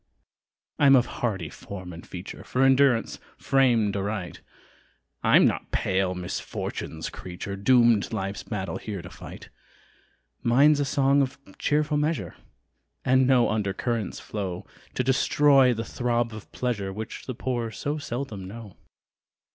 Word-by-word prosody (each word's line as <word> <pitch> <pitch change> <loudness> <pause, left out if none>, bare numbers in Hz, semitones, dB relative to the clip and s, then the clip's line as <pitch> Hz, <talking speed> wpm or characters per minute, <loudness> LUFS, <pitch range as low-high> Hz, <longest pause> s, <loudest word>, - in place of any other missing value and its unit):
I'm 140 -2 +7
of 125 -2 +4 0.2
hardy 95 -9 -1
form 95 0 -9
and 85 - -10
feature, 90 +1 -8
For 130 - 0
endurance 135 -3 +3 0.2
framed 120 -7 +2
aright; 100 -2 -3 0.8
I'm - - +6
not - - 0
pale 95 -1 0
misfortune's 85 -2 -5
creature, 95 +2 -7
Doomed 115 0 +4
life's 95 +1 -3
battle 95 0 -4
here 100 -5 -6
to 90 - -10
fight: 85 - -11 0.9
Mine's 140 +5 +5
a 145 - +1
song 140 0 +3
of 130 -1 -2 0.2
cheerful 150 0 +1
measure, 150 +2 -1 0.7
And 130 0 +4
no 125 -4 +4
under 105 -3 -1
currents 115 0 -2
flow 95 -4 -5 0.3
To 130 - +1
destroy 135 0 +4
the 115 -1 -2
throb 120 -1 -1
of 110 - -10
pleasure 105 -6 -2
Which 110 +3 -7
the 130 - -4
poor 120 -2 -2
so 145 +7 -3
seldom 120 -8 -5
know. 105 -1 -10
115 Hz, 135 wpm, -26 LUFS, 100-130 Hz, 0.9 s, I'm